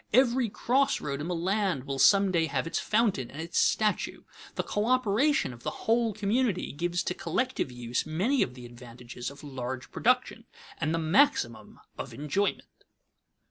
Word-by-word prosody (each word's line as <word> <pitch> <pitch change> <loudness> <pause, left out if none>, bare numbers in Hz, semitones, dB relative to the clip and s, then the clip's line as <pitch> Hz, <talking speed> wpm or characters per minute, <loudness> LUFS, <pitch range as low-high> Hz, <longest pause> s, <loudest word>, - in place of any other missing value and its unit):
Every 250 -1 +4
cross 265 +6 +1
road 140 -1 -4
in 155 - -4
the 180 - -1
land 185 -4 0
will 135 0 -4
some 195 +7 +5
day 165 -2 +2
have 140 -1 -1
its 165 - -1
fountain 210 - +1
and 145 - -10
its 170 +2 -1
statue. 215 -1 +1 0.3
The - - -1
coöperation 230 - +1
of 120 - -14
the - - -2 0.2
whole 230 +1 +2
community 215 0 0
gives 175 +4 -1
to - - -1
collective 170 - -2
use 120 0 -2
many 200 - +1
of 125 - -1
the 125 -1 -10
advantages 120 0 -8
of 140 +1 -13
large 130 -3 -6
production, - - +1 0.3
and 155 - 0
the 165 - +1
maximum 160 - +1 0.2
of - - -6
enjoyment. 150 +8 -2
170 Hz, 165 wpm, -28 LUFS, 135-215 Hz, 0.3 s, some